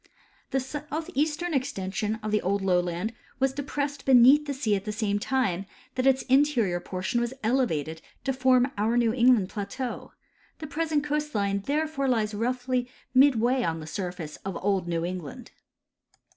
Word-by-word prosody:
The 270 - +1
south 295 +4 -5
eastern 310 +5 0
extension 215 -6 -1
of 215 - -2
the 210 - +2
old 195 +1 0
lowland 180 +3 0 0.3
was 270 0 +2
depressed 285 0 -3
beneath 270 +3 +6
the 285 - -1
sea 230 -6 +1
at 195 - -3
the 210 - -3
same 210 -1 -1
time 200 -7 0 0.3
that 255 +1 0
its 265 0 +3
interior 255 -10 +2
]3ortion 190 +7 -2
was 240 +2 -2
elevated 160 - 0 0.2
to 270 - 0
form 260 0 +3
our 225 +3 +2
New 230 -2 +3
England 240 -6 +4
plateau; 220 +5 -5 0.4
the 315 - -7
present 310 0 -1
coast 300 -1 -2
line 200 -1 +1
therefore 300 -1 0
lies 220 -4 +1
roughly 250 +3 -1 0.2
midway 255 -1 +4
on 165 -7 -1
the 155 - -8
surface 175 -2 -5
of 195 -1 -5
old 195 -3 +1
New 170 -1 -1
England. 175 -5 -6
240 Hz, 160 wpm, -27 LUFS, 195-270 Hz, 0.4 s, beneath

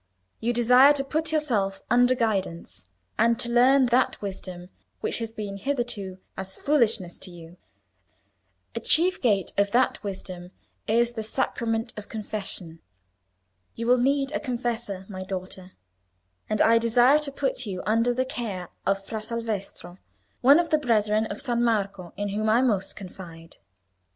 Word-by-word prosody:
You 235 - 0
desire 250 +4 +6
to 280 -1 -2
put 315 +3 -1
yourself 230 -11 0
under 245 +1 +5
guidance, 195 - -2 0.3
and 230 +1 +3
to 240 -1 +1
learn 255 +3 +5
that 250 +1 +2
wisdom 185 -3 -6 0.3
which - - -2
has 225 -1 -4
been 205 -3 -6
hitherto 220 -6 -3 0.2
as 190 0 -5
foolishness 225 - +1
to 190 - -4
you. 170 0 -13 1.2
A - - -3
chief 360 +3 +3
gate 205 -7 +1
of 200 0 +3
that 255 +2 +2
wisdom 185 -3 -6 0.4
is 235 +2 +2
the 230 -2 -5
sacrament 225 0 -2
of 210 - -8
confession. 200 -6 -6 1.0
You 230 - -4
will 250 +1 +4
need 275 +2 +1
a - - -1
confessor, 235 -6 -3
my 185 -2 -6
daughter, 185 0 -7 0.8
and 215 - +2
I 230 +1 +5
desire 240 +5 +4
to 300 -2 -5
put 270 -3 -2
you 185 -2 -4
under 230 +4 +2
the 255 +2 0
care 205 -9 -5 0.2
of 195 0 0
Fra 220 +1 -5
Salvestro, 215 -5 -5 0.4
one 280 +5 +7
of 345 - -1
the 310 - +4
brethren 215 -4 +1
of 205 - -6
San 240 -3 0
Marco, 200 -6 -1
in 205 0 -2
whom 215 +2 -1
I 235 +4 +4
most 200 -6 0
confide." 175 -4 -11
225 Hz, 155 wpm, -26 LUFS, 195-245 Hz, 1.2 s, one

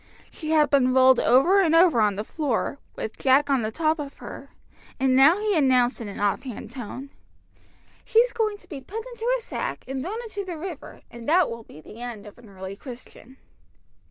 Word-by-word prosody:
She 310 - -7
had 305 -2 +3
been 255 -2 +3
rolled 260 -1 +6
over 345 +11 +4
and 330 -3 +3
over 330 -9 +5
on 205 -2 +2
the 210 - -3
floor, 280 +1 -2 0.2
with 220 - -6
Jack 280 +2 +3
on 270 -3 +3
the 215 - -2
top 315 +3 0
of 285 -1 -7
her, - - -10 0.5
and 260 -1 +2
now 285 +7 +6
he 420 -2 0
announced 255 -4 +3
in 225 - -5
an 200 - -8
offhand 215 +4 -2
tone 260 +2 -8 0.9
"She's 485 +1 +3
going 435 -3 -1
to 360 - -20
be 290 -7 -8
put 430 +11 -7
into 475 +1 -2
a - - -10
sack - - -4
and 265 0 -4
thrown 405 - -4
into 425 -3 -5
the 355 -4 -6
river, 335 -2 -8
and 235 +1 -7
that 345 -2 +4
will 230 0 -6
be 155 - -14
the 215 +9 -12
end 235 -4 -7
of 210 +3 -13
an 230 -3 -16
early 190 0 -8
Christian." 255 +2 -12
275 Hz, 205 wpm, -25 LUFS, 240-350 Hz, 0.9 s, rolled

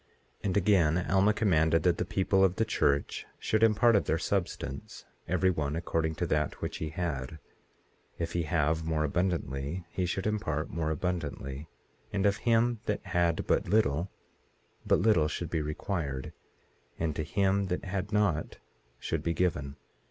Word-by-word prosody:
18:27 - - -11
And 100 0 +1
again 90 -4 +3
Alma 100 +2 +5
commanded 80 -7 +2
that 90 -1 +2
the - - 0
people 95 0 +2
of 95 -1 +3
the 110 - +1
church 70 -7 0
should 110 - 0
impart 115 +1 +5
of 100 - +3
their 80 - +1
substance, 85 -6 -3 0.2
every 90 +1 +2
one 75 -3 -2
according 80 -1 -1
to 85 - -1
that 75 -3 -1
which - - -4
he 80 - -3
had; 75 -4 -3 0.8
if 85 -1 -3
he 85 - +1
have 80 0 +1
more 80 -1 0
abundantly 85 -1 -1
he 90 -1 -1
should 95 +2 -2
impart 100 -8 -1
more 80 -2 -1
abundantly; 80 -4 -3 0.4
and 100 -1 0
of 100 0 +3
him 115 +1 +2
that - - -2
had 85 -1 +1
but - - +1
little, 95 -5 +2 0.8
but - - +5
little 90 -6 +4
should 85 +1 -4
be 80 - 0
required; 75 -3 -3 0.6
and 80 -2 -1
to - - -1
him 100 +4 +1
that 90 +1 -3
had 95 +1 -3
not 100 -7 +1 0.4
should - - -2
be 85 - -1
given. 75 -6 -1
85 Hz, 165 wpm, -30 LUFS, 75-100 Hz, 0.8 s, Alma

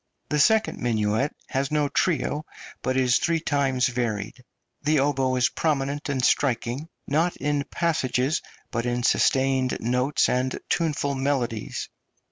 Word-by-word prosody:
The 150 - +1
second 220 +9 +3
minuet 110 +3 +1 0.2
has 135 -1 -1
no 150 -1 +1
trio, 150 -1 0 0.4
but 130 +1 -1
is 125 -1 +3
three 165 0 +1
times 140 -5 +1
varied. 120 -1 -2 0.4
The 155 +1 +2
oboe 135 -2 +1
is 125 -1 +3
prominent 145 -2 -1
and 130 -3 0
striking, 130 +3 0 0.2
not 160 +5 +1
in 145 -1 -1
passages, 150 -3 0 0.3
but 115 +1 -1
in 120 0 -1
sustained 130 0 +2
notes 125 +5 +1
and 130 +1 0
tuneful 150 -4 0
melodies. 130 -5 -2
135 Hz, 130 wpm, -25 LUFS, 125-145 Hz, 0.4 s, second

